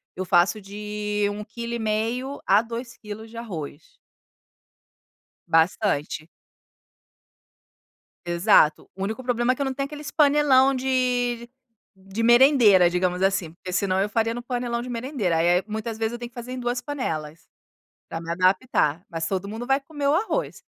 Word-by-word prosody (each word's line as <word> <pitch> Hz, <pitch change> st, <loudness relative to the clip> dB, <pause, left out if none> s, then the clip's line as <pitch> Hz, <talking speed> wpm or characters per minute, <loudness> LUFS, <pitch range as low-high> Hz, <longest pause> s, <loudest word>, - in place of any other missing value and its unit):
Eu 185 Hz, -, -4 dB
faço 175 Hz, +4 st, +3 dB
de 210 Hz, +1 st, -3 dB
1 210 Hz, +1 st, -6 dB
quilo 235 Hz, +2 st, -6 dB
e 235 Hz, -, -2 dB
meio 230 Hz, +6 st, -2 dB
a 200 Hz, +3 st, +5 dB
2 235 Hz, +1 st, -7 dB
quilos 215 Hz, +1 st, -9 dB
de 230 Hz, -, -11 dB
arroz. 230 Hz, -, -8 dB, 1.5 s
Bastante. 160 Hz, -2 st, +1 dB, 2.0 s
Exato! 170 Hz, -2 st, +3 dB
O 190 Hz, -, -4 dB
único 220 Hz, +6 st, -4 dB
problema, 245 Hz, 0 st, +1 dB
é -, -, -8 dB
que 280 Hz, -, -6 dB
eu -, -, +1 dB
não 265 Hz, -, -2 dB
tenho 275 Hz, +1 st, -2 dB
aqueles 295 Hz, +1 st, -8 dB
panelão 280 Hz, -3 st, +4 dB
de 250 Hz, -2 st, 0 dB, 0.5 s
de 195 Hz, +4 st, -4 dB
merendeira 240 Hz, -7 st, +6 dB
digamos 180 Hz, +1 st, 0 dB
assim, 190 Hz, -4 st, +1 dB
porque 180 Hz, +1 st, -8 dB
senão 190 Hz, 0 st, +1 dB
eu 200 Hz, -, +1 dB
faria 225 Hz, +1 st, 0 dB
no 240 Hz, -, -5 dB
panelão 240 Hz, -1 st, -2 dB
de 250 Hz, -, -7 dB
merendeira. 230 Hz, -, -1 dB
Aí 170 Hz, +1 st, +3 dB
aí, -, -, -8 dB
muitas 220 Hz, +1 st, -4 dB
vezes, 225 Hz, +1 st, -1 dB
eu 240 Hz, -, -6 dB
tenho 240 Hz, 0 st, -6 dB
que -, -, -36 dB
fazer 245 Hz, +1 st, -7 dB
em 255 Hz, -, -5 dB
2 245 Hz, 0 st, -1 dB
panelas. 165 Hz, -, -5 dB, 0.6 s
Pra 165 Hz, -, -4 dB
me 165 Hz, -, -8 dB
adaptar, 180 Hz, -, +1 dB
mas 165 Hz, -1 st, -3 dB
todo 195 Hz, 0 st, -2 dB
mundo 225 Hz, +4 st, -6 dB
vai 270 Hz, +1 st, +2 dB
comer 285 Hz, 0 st, -4 dB
o 285 Hz, -, +4 dB
arroz. 445 Hz, +8 st, -1 dB
225 Hz, 170 wpm, -24 LUFS, 190-250 Hz, 2.0 s, merendeira